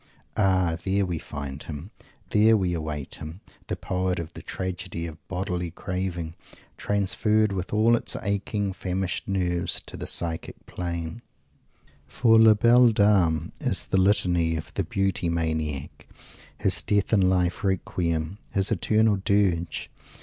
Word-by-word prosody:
Ah, 95 -5 +2
there 100 +1 +1
we 85 -3 -3
find 70 -1 -6
him 80 +6 -7 0.4
there 110 +1 +5
we 90 -3 0
await 75 -4 -4
him 80 +4 -7 0.3
the - - -2
poet 90 0 -1
of 85 0 -5
the - - -9
tragedy 90 -2 -4
of 80 -1 -8
bodily 90 -2 -2
craving, 90 -1 -4 0.4
transferred, 105 +1 +1
with 95 -1 -3
all 110 +3 +4
its - - -2
aching, 100 0 -1
famished 95 0 -3
nerves, 90 -3 0
on - - -1
to - - -8
the - - -5
psychic 85 -2 -3
plane! 85 +3 -5 0.9
For 115 -2 +4
"La 110 -1 +7
Belle 120 +3 +6
Dame" 95 -7 +3
is - - 0
the - - 0
Litany 90 -4 +3
of 80 - -6
the - - -1
Beauty 95 -3 -1
Maniac 80 -4 -2 0.5
his - - +1
death 105 +1 0
in 95 -3 +4
life 90 +3 +1
Requiem, 85 -2 -1
his 95 0 0
eternal 110 -1 +3
Dirge! 95 -4 0
90 Hz, 140 wpm, -26 LUFS, 85-100 Hz, 0.9 s, La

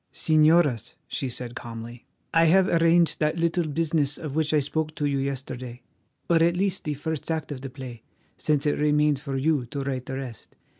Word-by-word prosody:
"Señoras," 155 -6 +3
she 135 - -3
said 125 0 -5
calmly, 120 0 -8 0.3
"I 165 0 +5
have 185 +3 +5
arranged 170 0 +3
that 155 +2 +1
little 170 0 +1
business 150 -2 0
of 150 -4 -6
which 155 0 +1
I 155 - +4
spoke 155 +2 -2
to 145 - -1
you 140 -1 +1
yesterday, 130 -2 -5 0.4
or 170 - +4
at 170 +1 +3
least 195 0 -1
the 150 -1 -1
first 160 +2 -4
act 160 -2 -2
of 135 -3 -5
the 135 - -6
play, 130 -3 -9 0.3
since 150 -2 0
it 145 - +1
remains 150 -1 +2
for 140 -3 -3
you 140 -2 +1
to 140 +3 -4
write 130 -2 -3
the 130 - -4
rest. 125 -6 -8
150 Hz, 195 wpm, -26 LUFS, 130-160 Hz, 0.4 s, I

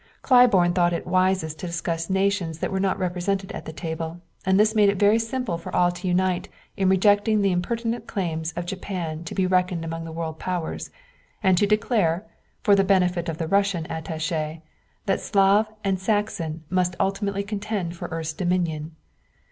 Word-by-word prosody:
Claiborne 230 -9 +5
thought 175 -1 +2
it 170 - -3
wisest 185 -4 +1
to 180 - -4
discuss 170 0 -3
nations 190 -4 0
that - - -3
were 190 - -1
not 195 -1 +1
represented 190 +2 -2
at - - -7
the - - -6
table, 160 +1 -5 0.3
and 190 +1 +4
this 215 +1 +4
made 210 -2 +5
it 200 - 0
very 205 +3 +4
simple 225 -6 -2
for 170 - -8
all 175 0 +4
to 175 +2 -6
unite 180 0 +1 0.3
in 190 -1 +2
rejecting 205 +3 +4
the 195 - +3
impertinent 230 +6 -2
claims 165 -4 -2
of 175 +1 -4
Japan 175 -4 -4
to - - -6
be 190 - +2
reckoned 180 -2 +1
among 165 0 -5
world 160 -1 -4
powers, 180 -3 -3 0.5
and 190 -2 +5
to 205 - +3
declare, 210 -4 +1 0.4
for 205 - +5
the 195 - +4
benefit 180 -3 +2
of 160 - -4
the 165 - -3
Russian 195 -2 +2
attaché, 160 0 -3 0.4
that 195 - 0
Slav 200 +2 +3 0.2
and 195 -2 0
Saxon 185 -6 -1
must 180 -1 +1
ultimately 200 0 0
contend 205 -4 -3
for 175 0 -6
the 165 - -5
earth's 160 -1 -3
dominion. 165 -3 -1
185 Hz, 180 wpm, -24 LUFS, 165-200 Hz, 0.5 s, Claiborne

